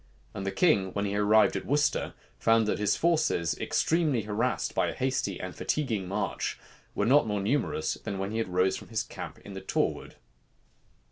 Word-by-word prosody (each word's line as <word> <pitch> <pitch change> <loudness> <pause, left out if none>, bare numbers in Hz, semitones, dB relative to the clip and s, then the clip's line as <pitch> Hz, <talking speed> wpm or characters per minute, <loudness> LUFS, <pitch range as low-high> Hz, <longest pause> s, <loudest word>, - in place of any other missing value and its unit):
And 100 0 -5
the - - 0
king, 100 - +2
when 100 0 -1
he 100 0 -2
arrived 105 +1 +4
at - - -4
Worcester, 150 +1 +1 0.2
found 115 0 +4
that 105 - -1
his 105 -1 +1
forces, 155 - +1
extremely 155 -8 +1
harassed 110 +4 -1
by - - +1
a - - -4
hasty 130 -7 -1
and 90 -1 -6
fatiguing 115 -11 -1
march, 100 +1 -2 0.4
were 105 - +1
not 135 +2 +5
more 105 -1 -1
numerous 100 - 0
than 100 -3 -5
when 95 +1 -3
he 110 +1 -1
rose 90 -2 +1
from - - -11
his 110 -1 -1
camp - - -8
in 100 - -8
the 95 - -6
Torwood. 95 - -2
105 Hz, 185 wpm, -28 LUFS, 100-130 Hz, 0.4 s, not